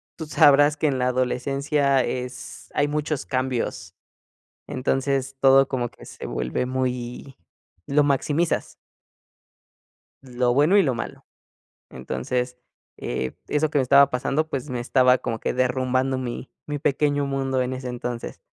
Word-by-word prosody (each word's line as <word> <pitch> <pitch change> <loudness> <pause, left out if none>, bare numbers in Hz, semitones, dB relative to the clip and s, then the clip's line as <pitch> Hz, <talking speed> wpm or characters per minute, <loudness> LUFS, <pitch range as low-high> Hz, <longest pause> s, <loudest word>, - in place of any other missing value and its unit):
tú 160 - -6
sabrás 145 0 +5
que 155 - +1
en 135 -2 0
la 125 0 +1
adolescencia, 135 +2 +1
es 125 0 -6
hay 145 0 +2
muchos 150 -1 -2
cambios. 125 -9 -2 0.7
Entonces, 135 +1 -1
todo 135 0 +6
como 120 -3 -2
que - - -16
se - - -9
vuelve 65 - -2
muy 125 0 -3 0.5
lo 145 +1 +3
maximizas. 145 +4 0 1.5
Lo 125 -1 0
bueno 150 +9 +4
y 195 - +6
lo 130 -4 0
malo. 120 - -7 0.6
Entonces, 125 0 -3 0.4
eh, 65 +1 -3
eso 150 +1 +1
que 150 - -1
me - - +4
estaba 140 +2 +6
pasando, 140 +4 -1
pues, 135 +1 -4
me 125 -1 -3
estaba 125 +1 +4
como 115 -2 -4
que - - -2
derrumbando 130 +1 0
mi 125 0 -5 0.2
mi 145 -1 -4
pequeño 145 0 +1
mundo 135 -1 -1
en 125 +1 -2
ese 130 -1 -5
entonces. 120 -1 -5
130 Hz, 140 wpm, -24 LUFS, 125-140 Hz, 1.5 s, todo